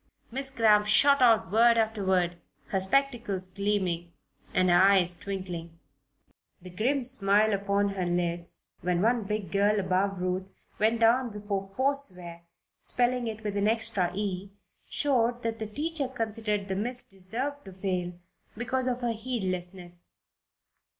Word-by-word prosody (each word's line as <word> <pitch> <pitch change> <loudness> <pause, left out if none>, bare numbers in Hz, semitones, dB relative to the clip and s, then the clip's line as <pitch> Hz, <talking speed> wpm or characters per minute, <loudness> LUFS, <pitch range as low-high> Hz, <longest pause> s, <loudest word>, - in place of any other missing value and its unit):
Miss 270 +2 -1
Cramp 215 -5 +3
shot 280 +6 +5
out 225 -8 +4
word 230 +2 +5
after 220 -2 0
word, 180 -2 +1 0.3
her 195 - 0
spectacles 225 -3 0
gleaming 185 -3 -2 0.4
and 185 0 +2
her 175 +1 +6
eyes 190 -2 +4
twinkling. 175 -4 -6 0.8
The 180 -1 -12
grim 215 +7 -2
little 270 - -3
smile 215 -3 +5
upon 200 0 0
her 190 -3 -3
lips 175 -1 -1
when 180 +1 0
one 230 -1 +2
big 210 -4 -4
girl 205 +2 +2
above 190 0 0
Ruth 185 +1 -2 0.3
went 225 +2 +2
down 240 +2 +4
before 205 -2 -4
"forswear," 190 -12 +1 0.4
spelling 245 0 +1
it 220 0 -6
with 205 -1 -3
an 200 +1 +1
extra 215 -5 +1
"e," 195 -1 -3 0.4
showed 245 -4 +1
that 230 0 -3
the 220 - -4
teacher 295 +5 -2
considered 220 -4 -3
the 190 - -2
miss 240 +5 -2
deserved 235 +10 -5
to 190 - -10
fail 185 -2 -3 0.4
because 255 +2 -1
of 250 0 -2
her 240 -1 0
heedlessness. 185 -6 -4
205 Hz, 145 wpm, -28 LUFS, 185-235 Hz, 0.8 s, her